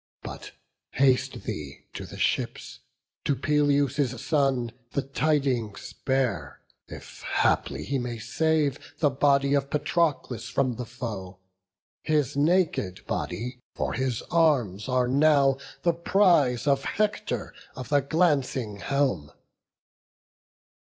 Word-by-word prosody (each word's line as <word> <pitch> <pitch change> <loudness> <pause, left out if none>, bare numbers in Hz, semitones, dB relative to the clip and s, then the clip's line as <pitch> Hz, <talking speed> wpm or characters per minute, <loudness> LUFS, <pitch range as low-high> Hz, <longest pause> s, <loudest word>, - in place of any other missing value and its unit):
But - - -8 0.4
haste 130 -1 +2
thee 70 -2 -6
to - - -6
the - - -10
ships, - - -2 0.4
to 140 - +1
Peleus' 145 -2 +1
son 135 -6 +1 0.2
The 140 - 0
tidings 135 -6 -1
bear, 110 - -1 0.3
if - - -11
haply - - +1
he 140 0 -1
may 120 -1 -4
save 155 +3 0 0.2
The 145 -3 +2
body 140 +1 +3
of 140 -1 +1
Patroclus 145 -7 0
from 125 -1 0
the 125 -2 -5
foe; 105 -7 -6 0.6
His 150 -3 0
naked 150 - +1
body, 120 +7 -4 0.2
for - - -2
his 130 -3 -1
arms 130 - +2
are 125 -1 +2
now 140 0 +4 0.2
The 170 - +3
prize 170 - +3
of 140 -1 +2
Hector 210 0 -1 0.2
of 125 -3 -7
the 145 - +4
glancing 135 - +1
helm." 130 - 0
135 Hz, 115 wpm, -26 LUFS, 120-145 Hz, 0.6 s, now